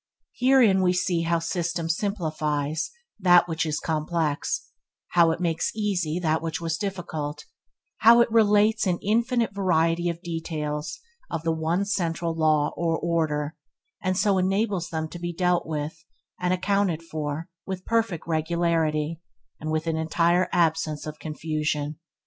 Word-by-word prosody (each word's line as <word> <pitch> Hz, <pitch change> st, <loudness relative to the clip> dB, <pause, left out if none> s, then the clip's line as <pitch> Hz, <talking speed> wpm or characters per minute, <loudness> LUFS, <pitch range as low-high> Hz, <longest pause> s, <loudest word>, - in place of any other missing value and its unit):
Herein 245 Hz, -7 st, +4 dB
we 180 Hz, -1 st, +3 dB
see 180 Hz, -1 st, +1 dB
how 170 Hz, 0 st, +1 dB
system 170 Hz, 0 st, -2 dB
simplifies 155 Hz, -5 st, -1 dB, 0.3 s
that 175 Hz, -2 st, +6 dB, 0.2 s
is 155 Hz, -2 st, -1 dB
complex: 155 Hz, -1 st, -1 dB, 0.4 s
how 170 Hz, -1 st, +5 dB
it 165 Hz, -, -1 dB
makes 165 Hz, -2 st, 0 dB
easy 185 Hz, -7 st, -1 dB
that 160 Hz, -3 st, +1 dB
which 165 Hz, -1 st, -3 dB
was 165 Hz, -1 st, -2 dB
difficult; 160 Hz, -7 st, -4 dB, 0.5 s
how 230 Hz, +2 st, +7 dB
it 235 Hz, -1 st, +3 dB
relates 215 Hz, -1 st, +4 dB
an 180 Hz, -2 st, +1 dB
infinite 230 Hz, +1 st, +1 dB
variety 170 Hz, -3 st, +2 dB
of 170 Hz, +1 st, -5 dB
details 155 Hz, -3 st, -4 dB, 0.3 s
of 160 Hz, -, -3 dB
the 165 Hz, -, +1 dB
one 160 Hz, +4 st, 0 dB
central 170 Hz, -4 st, -1 dB
law 155 Hz, -2 st, +2 dB
or 165 Hz, -1 st, 0 dB
order, 155 Hz, -3 st, -1 dB, 0.5 s
and 185 Hz, -1 st, 0 dB
so 195 Hz, -2 st, +3 dB
enables 190 Hz, -1 st, 0 dB
them 160 Hz, -1 st, -2 dB
to 175 Hz, -, -9 dB
be 175 Hz, 0 st, -3 dB
dealt 180 Hz, 0 st, +1 dB
with 155 Hz, 0 st, -4 dB, 0.4 s
and 180 Hz, 0 st, 0 dB
accounted 185 Hz, -2 st, +1 dB
for 155 Hz, -1 st, -4 dB, 0.2 s
with 190 Hz, -1 st, -5 dB
perfect 225 Hz, -7 st, 0 dB
regularity, 160 Hz, -1 st, 0 dB, 0.4 s
and 155 Hz, -, -5 dB
with 155 Hz, +1 st, -1 dB
an 165 Hz, -1 st, 0 dB
entire 170 Hz, +3 st, +2 dB
absence 160 Hz, -3 st, +1 dB
of 155 Hz, 0 st, -7 dB
confusion. 155 Hz, -1 st, -2 dB
165 Hz, 145 wpm, -25 LUFS, 155-185 Hz, 0.5 s, how